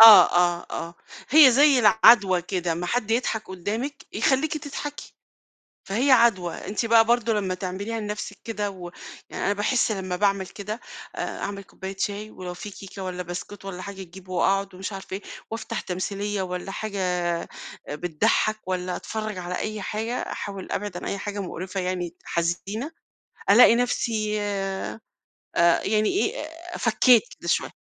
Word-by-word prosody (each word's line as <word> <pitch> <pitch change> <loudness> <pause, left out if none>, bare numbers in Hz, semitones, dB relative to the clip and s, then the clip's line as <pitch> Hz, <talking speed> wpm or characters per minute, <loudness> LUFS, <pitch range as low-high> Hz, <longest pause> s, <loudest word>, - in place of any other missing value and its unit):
آه، 225 -1 +12
آه، 175 -1 +2
آه. 170 +1 -5 0.3
هي 295 -1 +9
زي 275 +1 +6
العدوى 210 -5 +6
كده، 180 -2 -1
أما 170 +2 -3
حد 225 +2 -1
يضحك 225 -3 0
قدامِك، 220 +10 -4
يخليكِ 295 +3 +1
تضحكي، 290 0 -7 0.7
فهي 245 +8 +1
عدوى. 200 -9 +4
أنتِ 210 +5 -3
بقى 225 0 +6
برضه 235 0 +2
لمّا 195 -4 0
تعمليها 195 +5 -4
لنفسِك 210 -1 -5
كده 210 -3 -2
و 180 -2 -8 0.4
يعني - - -4
أنا 200 - +3
باحس 215 +2 +1
لمّا 185 -2 -3
باعمِل 195 -1 +1
كده 210 +4 -6 0.4
آآ، - - -3
أعمِل 200 0 -4
كوباية 190 0 -8
شاي 210 +1 -2
ولو 180 -1 -7
في 205 +4 -7
كيكة 195 0 -9
والّا 180 -1 -4
بسكوت 180 +3 -7
والّا 185 -2 -6
حاجة، 200 0 -7
أجيب 185 +1 -13
وأقعد 195 +1 +1
ومش 190 +2 -5
عارفة 195 -1 -7
إيه، 200 - -9 0.3
وأفتح 225 0 -4
تمثيلية 200 +2 -3
والّا 180 +1 -4
حاجة 205 -1 -4 0.9
بتضحك 175 +7 0
والّا 180 -1 -2
أتفرج 215 -3 -4
على 180 0 -4
أي 215 -1 -3
حاجة. 220 +4 -3 0.2
أحاول 195 -2 -6
أبعِد 205 -3 -3
عن - - -6
أي 200 - -2
حاجة 205 +1 -4
مقرفة 185 +1 -4
يعني 180 -2 -2
حزينة، 195 - -2 0.6
ألاقي 230 +2 +8
نفسي 215 -3 0
آآ، 195 +1 -3 0.8
يعني 215 0 +2
إيه، 410 -2 -1 0.3
فكيت 235 +1 +5 0.2
كده - - -6
شوية. - - +1
200 Hz, 155 wpm, -25 LUFS, 185-220 Hz, 0.9 s, آه